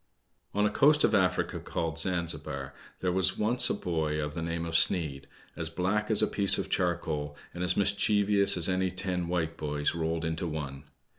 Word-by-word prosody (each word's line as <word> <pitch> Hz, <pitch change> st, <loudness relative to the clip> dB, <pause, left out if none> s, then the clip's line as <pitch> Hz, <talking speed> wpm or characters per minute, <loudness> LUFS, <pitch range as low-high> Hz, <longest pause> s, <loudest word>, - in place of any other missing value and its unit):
O -, -, -1 dB
N 105 Hz, -, +4 dB
a 105 Hz, -, +1 dB
coast 150 Hz, +1 st, +4 dB
of -, -, +3 dB
Africa 90 Hz, -3 st, +1 dB
called 80 Hz, -1 st, -3 dB
Zanzibar, 80 Hz, -6 st, -2 dB, 0.3 s
there 90 Hz, -, +1 dB
was 95 Hz, +1 st, +1 dB
once 115 Hz, +4 st, +3 dB
a -, -, +1 dB
boy 80 Hz, -5 st, -2 dB
of 75 Hz, -1 st, -3 dB
the 85 Hz, -, -4 dB
name 85 Hz, 0 st, -3 dB
of 80 Hz, -, -5 dB
Sneid, 75 Hz, -7 st, +2 dB, 0.3 s
as 80 Hz, -2 st, -3 dB
black 95 Hz, +6 st, -1 dB
as 110 Hz, -, +3 dB
a -, -, +3 dB
piece 100 Hz, -1 st, +2 dB
of -, -, -4 dB
charcoal, 80 Hz, -4 st, -1 dB, 0.2 s
and 90 Hz, -, -4 dB
as 90 Hz, 0 st, +1 dB
mischievous 100 Hz, 0 st, +3 dB
as 85 Hz, -, +2 dB
any 95 Hz, 0 st, +1 dB
ten 90 Hz, -1 st, -3 dB
white 85 Hz, -2 st, -2 dB
boys 75 Hz, -1 st, -1 dB
rolled 80 Hz, 0 st, -2 dB
into 80 Hz, +2 st, -2 dB
one. 75 Hz, -3 st, -5 dB
85 Hz, 195 wpm, -29 LUFS, 80-95 Hz, 0.3 s, N